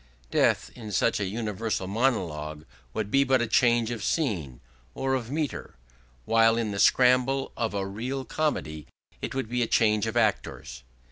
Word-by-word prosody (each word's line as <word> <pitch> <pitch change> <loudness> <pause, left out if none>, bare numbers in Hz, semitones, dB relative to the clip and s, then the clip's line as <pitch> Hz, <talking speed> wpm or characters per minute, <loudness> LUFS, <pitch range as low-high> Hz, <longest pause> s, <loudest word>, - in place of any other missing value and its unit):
Death - - +2
in 110 -4 -8
such 110 +3 +1
a 100 - -1
universal 105 -1 -3
monologue 85 - -1 0.3
would 105 - -3
be 135 0 +4
but 130 -1 +3
a 120 - +1
change 120 0 +3
of 115 -4 -4
scene 90 - -1 0.4
or 135 0 -1
of 120 -3 -2
metre, 150 -1 -3 0.5
while 115 0 +4
in 115 -3 -1
the 100 - -4
scramble 130 +3 +3
of 115 -3 -2
a 100 -1 -1
real 125 +7 -4
comedy 80 - -2 0.3
it - - -4
would 135 -4 -2
be 125 +2 -1
a 115 - +1
change 110 -1 +2
of 110 +2 -2
actors. 105 - -1
115 Hz, 165 wpm, -27 LUFS, 100-125 Hz, 0.5 s, be